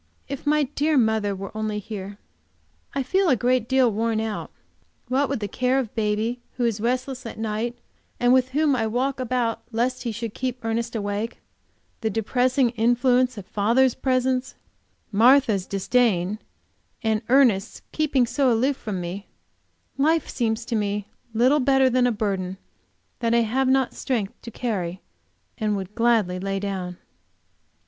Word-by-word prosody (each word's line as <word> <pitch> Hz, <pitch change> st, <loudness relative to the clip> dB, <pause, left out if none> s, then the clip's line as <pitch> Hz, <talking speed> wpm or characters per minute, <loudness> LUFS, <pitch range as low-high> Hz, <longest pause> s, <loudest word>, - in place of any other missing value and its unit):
If 280 Hz, +1 st, -6 dB
my 300 Hz, 0 st, +4 dB
dear 295 Hz, +2 st, 0 dB
mother 220 Hz, -4 st, +2 dB
were 195 Hz, +2 st, -8 dB
only 215 Hz, -1 st, -2 dB
here! 200 Hz, -1 st, -6 dB, 0.8 s
I 275 Hz, -, 0 dB
feel 375 Hz, +8 st, +2 dB
a 260 Hz, -, +5 dB
good 245 Hz, 0 st, +1 dB
deal 260 Hz, -2 st, +3 dB
worn 225 Hz, +1 st, 0 dB
out. 220 Hz, -1 st, -3 dB, 0.6 s
What 270 Hz, +2 st, +1 dB
with 270 Hz, -5 st, -2 dB
the 205 Hz, -, -1 dB
care 255 Hz, +5 st, +1 dB
of 250 Hz, -5 st, -2 dB
baby, 220 Hz, +3 st, -1 dB
who 245 Hz, -, -1 dB
is 220 Hz, -3 st, -1 dB
restless 255 Hz, +2 st, -1 dB
at -, -, -8 dB
night, 225 Hz, +2 st, -2 dB, 0.4 s
and 245 Hz, +1 st, +4 dB
with 255 Hz, 0 st, +3 dB
whom 290 Hz, +1 st, +2 dB
I 220 Hz, -3 st, 0 dB
walk 260 Hz, +4 st, -1 dB
about 245 Hz, -2 st, -1 dB
lest 245 Hz, +3 st, 0 dB
he 240 Hz, -2 st, -2 dB
should 225 Hz, 0 st, -5 dB
keep 250 Hz, -2 st, -4 dB
Ernest 230 Hz, +1 st, -2 dB
awake, 205 Hz, +2 st, -3 dB, 0.6 s
the 220 Hz, -, -1 dB
depressing 245 Hz, +4 st, +1 dB
influence 245 Hz, +1 st, +2 dB
of 200 Hz, -, -7 dB
father's 235 Hz, +6 st, +2 dB
presence, 260 Hz, 0 st, 0 dB, 0.6 s
Martha's 225 Hz, -3 st, +4 dB
disdain, 200 Hz, -1 st, +1 dB, 0.6 s
and 220 Hz, -1 st, +1 dB
Ernest 240 Hz, -6 st, +3 dB
keeping 290 Hz, -5 st, +2 dB
so 265 Hz, +1 st, +2 dB
aloof 255 Hz, +4 st, +1 dB
from 205 Hz, -5 st, -4 dB
me, 180 Hz, +3 st, -6 dB, 0.7 s
life 315 Hz, +2 st, +2 dB
seems 225 Hz, -2 st, -1 dB
to 230 Hz, -, -2 dB
me 205 Hz, -1 st, -1 dB, 0.2 s
little 250 Hz, +6 st, +3 dB
better 270 Hz, -1 st, +4 dB
than 250 Hz, 0 st, +3 dB
a -, -, +2 dB
burden 195 Hz, -4 st, -2 dB, 0.6 s
that 230 Hz, -1 st, +1 dB
I 235 Hz, -, +5 dB
have 255 Hz, +4 st, +1 dB
not 265 Hz, -1 st, +2 dB
strength 225 Hz, -7 st, -2 dB
to 235 Hz, -, -8 dB
carry 190 Hz, -7 st, -3 dB, 0.6 s
and 210 Hz, -2 st, 0 dB
would 190 Hz, +1 st, -6 dB
gladly 225 Hz, -6 st, +2 dB
lay 195 Hz, +1 st, -2 dB
down. 190 Hz, -3 st, -4 dB
235 Hz, 155 wpm, -24 LUFS, 210-255 Hz, 0.8 s, a